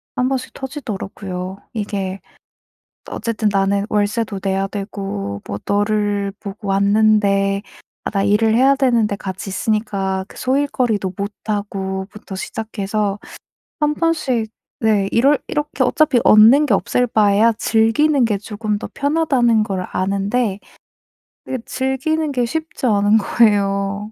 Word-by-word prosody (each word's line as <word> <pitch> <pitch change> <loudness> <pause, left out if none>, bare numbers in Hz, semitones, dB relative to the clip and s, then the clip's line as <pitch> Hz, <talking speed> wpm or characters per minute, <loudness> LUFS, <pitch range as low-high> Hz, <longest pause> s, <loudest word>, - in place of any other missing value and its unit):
1 250 +1 +1
번씩 265 -1 -3
터지더라고요. 195 -8 -6 0.2
이게 200 -3 -3 0.9
어쨌든 225 -2 -1
"나는 200 +1 +1
월세도 210 -1 0
내야 195 0 0
되고 195 - -5
뭐 100 - -5
너를 205 -1 0
보고 200 0 -7
왔는데. 200 0 +3 0.5
아 - - 0
나 200 -2 0
일을 210 +2 +3
해야 265 +4 +4
되는데 235 -6 +2
같이 190 0 -6
있으니까 195 -2 -1
그 - - -15
소일거리도 250 -8 0
못 200 +1 -3
하고." 195 -2 -3
부터 210 -2 -10
시작해서 205 0 -3 0.6
1 300 0 +2
번씩 275 -9 0 0.3
네 210 -3 +2
이럴 275 +5 +4
이렇게 295 -2 -2
어차피 265 0 +3
얻는 230 +8 +7
게 225 - +3
없을 245 +5 +1
바에야 215 +1 +3
즐기는 235 +6 +2
게 210 -2 0
조금 210 +1 -3
더 - - -6
편하다는 275 -7 +2
걸 190 -3 -3
아는데 200 +2 -1 0.9
이게 260 - -2
즐기는 285 +4 -1
게 245 -2 +1
쉽지 315 +2 -4
않은 205 -2 +4
거예요. 200 -1 +1
210 Hz, 265 characters per minute, -19 LUFS, 195-245 Hz, 0.9 s, 얻는